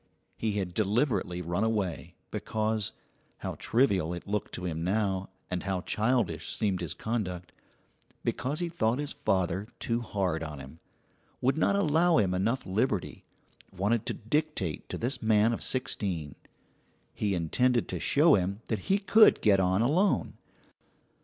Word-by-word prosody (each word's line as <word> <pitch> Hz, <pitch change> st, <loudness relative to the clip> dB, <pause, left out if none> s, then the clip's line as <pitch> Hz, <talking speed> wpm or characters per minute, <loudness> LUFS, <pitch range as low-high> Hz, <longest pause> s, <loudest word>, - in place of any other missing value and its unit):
He 110 Hz, -2 st, -1 dB
had 95 Hz, -3 st, -2 dB
deliberately 105 Hz, -4 st, 0 dB
run 85 Hz, +5 st, -1 dB
away, 105 Hz, -6 st, -2 dB, 0.2 s
because 110 Hz, -1 st, -1 dB, 0.5 s
how -, -, -4 dB
trivial 95 Hz, -9 st, +2 dB
it 85 Hz, -, -8 dB
looked 105 Hz, 0 st, -2 dB
to 90 Hz, -, -5 dB
him 80 Hz, -2 st, -3 dB
now, 95 Hz, 0 st, 0 dB, 0.2 s
and 90 Hz, -1 st, -1 dB
how 95 Hz, -2 st, -2 dB
childish 110 Hz, -5 st, 0 dB
seemed 100 Hz, -5 st, 0 dB
his 85 Hz, -, -3 dB
conduct 95 Hz, -6 st, -3 dB, 0.7 s
because 140 Hz, +4 st, -1 dB
he 175 Hz, -, 0 dB
thought 125 Hz, -9 st, 0 dB
his 145 Hz, +1 st, -3 dB
father 95 Hz, -, 0 dB
too 115 Hz, 0 st, -1 dB
hard 95 Hz, -7 st, -1 dB
on 75 Hz, -2 st, -5 dB
him; 70 Hz, +4 st, -11 dB, 0.6 s
would 130 Hz, +2 st, +2 dB
not 160 Hz, +5 st, +2 dB
allow 170 Hz, -2 st, +3 dB
him 95 Hz, -4 st, +2 dB
enough 110 Hz, +8 st, 0 dB
liberty; 105 Hz, 0 st, -1 dB, 0.5 s
wanted 105 Hz, +4 st, +1 dB
to -, -, -1 dB
dictate 115 Hz, -, -2 dB
to -, -, -3 dB
this 125 Hz, +4 st, -2 dB
man 110 Hz, +1 st, +3 dB
of -, -, -4 dB
sixteen; 95 Hz, -, -2 dB, 0.8 s
he 100 Hz, -2 st, -1 dB
intended 120 Hz, +9 st, +1 dB
to -, -, -3 dB
show 150 Hz, +2 st, +4 dB
him 100 Hz, +2 st, +1 dB
that 110 Hz, -4 st, -3 dB
he 195 Hz, -, +5 dB
could 210 Hz, +2 st, +6 dB
get 100 Hz, -3 st, +4 dB
on 95 Hz, +3 st, +2 dB
alone. 175 Hz, +11 st, +2 dB
105 Hz, 150 wpm, -29 LUFS, 90-125 Hz, 0.8 s, could